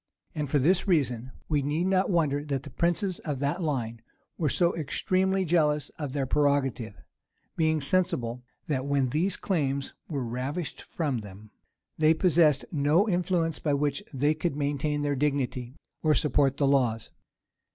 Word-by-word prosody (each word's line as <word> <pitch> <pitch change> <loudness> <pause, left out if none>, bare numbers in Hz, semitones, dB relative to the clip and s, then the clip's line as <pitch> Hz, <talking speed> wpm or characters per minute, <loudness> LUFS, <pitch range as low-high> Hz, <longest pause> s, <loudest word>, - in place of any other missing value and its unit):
And, 150 -2 -3
for 145 - +2
this 175 +9 +2
reason, 130 - +1 0.2
we 150 -2 +1
need 150 +5 -1
not 190 0 +2
wonder 150 -6 +1
that 140 -3 -2
the 145 - -10
princes 175 +5 0
of 145 -4 -4
that 145 +7 -1
line 120 -8 -2 0.3
were 155 -4 0
so 170 +5 +2
extremely 185 +5 0
jealous 150 -3 +2
of 145 -4 -6
their 140 -1 -1
prerogative; 135 -6 0 0.6
being 160 -1 +1
sensible, 135 -7 0 0.2
that 140 -5 -2
when 140 -2 +1
these 175 +8 0
claims 140 -7 -1 0.2
were 140 -6 -2
ravished 135 +8 -4
from 145 -7 -2
them, 105 +1 -12 0.5
they 155 +1 +5
possessed 155 -6 +3
no 155 +7 +3
influence 175 -3 0
by 145 -2 0
which 145 0 0
they 145 +2 +2
could 155 -1 -2
maintain 145 0 -1
their 145 -1 0
dignity, 135 -3 -1 0.3
or 155 -1 +3
support 140 -3 +2
the 140 - +2
laws. 125 -5 +1
145 Hz, 155 wpm, -27 LUFS, 135-165 Hz, 0.6 s, they